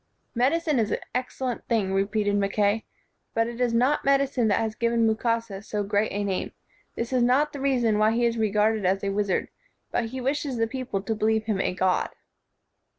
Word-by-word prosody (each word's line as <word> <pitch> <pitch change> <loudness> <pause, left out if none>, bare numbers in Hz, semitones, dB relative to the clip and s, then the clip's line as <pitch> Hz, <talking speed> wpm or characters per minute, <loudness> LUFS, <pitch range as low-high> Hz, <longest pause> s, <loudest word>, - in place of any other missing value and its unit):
"Medicine 290 +3 +1
is 215 -2 +1
an - - 0 0.2
excellent 250 0 -3
thing," 210 -5 +1
repeated 205 +1 +1
Mackay, 205 +2 +1 0.5
"but 225 - +3
it 235 +1 -5
is 245 -1 +2
not 250 +6 +2
medicine 275 -4 +2
that 205 - +3
has 220 -1 -1
given 235 0 +1
Mukasa 225 -2 0
so 210 0 -3
great 205 +1 0
a 205 +1 -2
name. 195 -2 -2 0.4
This 230 +2 -3
is 255 - +3
not 260 +5 +3
the 280 - -6
reason 240 -6 +2
why 215 +1 +4
he 240 +1 +2
is 235 0 +1
regarded 215 -1 +1
as 190 +2 +1
a 200 - 0
wizard, 200 -1 0 0.4
but 240 - 0
he 255 +4 -5
wishes 275 0 -1
the 225 - +2
people 245 -5 -4
to 220 - -1
believe 220 0 +1
him 210 -3 0
a 180 - -1
god." 185 0 +1
225 Hz, 195 wpm, -26 LUFS, 205-250 Hz, 0.5 s, why